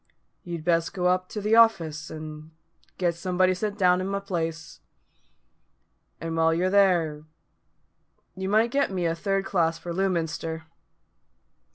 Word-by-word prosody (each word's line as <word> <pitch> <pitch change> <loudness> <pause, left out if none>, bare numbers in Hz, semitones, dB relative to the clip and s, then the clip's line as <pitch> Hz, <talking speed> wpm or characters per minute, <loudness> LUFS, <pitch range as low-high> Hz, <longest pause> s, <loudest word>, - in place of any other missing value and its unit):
"You'd 170 -3 -6
best 165 +1 +1
go 180 -2 -2
up 185 0 +1
to 210 - -5
the 210 +2 +2
office, 165 -9 +3
and 155 0 -8 0.5
get 175 -2 +1
somebody 185 +2 +1
sent 205 +2 -3
down 180 -2 +3
i' - - -2
my 200 +1 -2
place. 165 -5 -4 1.4
And 165 0 -4
while 165 0 +3
you're 185 +2 +1
there, 170 -7 +2 1.1
you 190 0 -4
might 220 +3 +3
get 280 +1 +1
me 185 -3 -2
a 165 - +1
third 195 +3 -1
class 165 -4 +1
for 170 +1 -6
Lewminster." 165 -3 -2
180 Hz, 145 wpm, -26 LUFS, 165-195 Hz, 1.4 s, office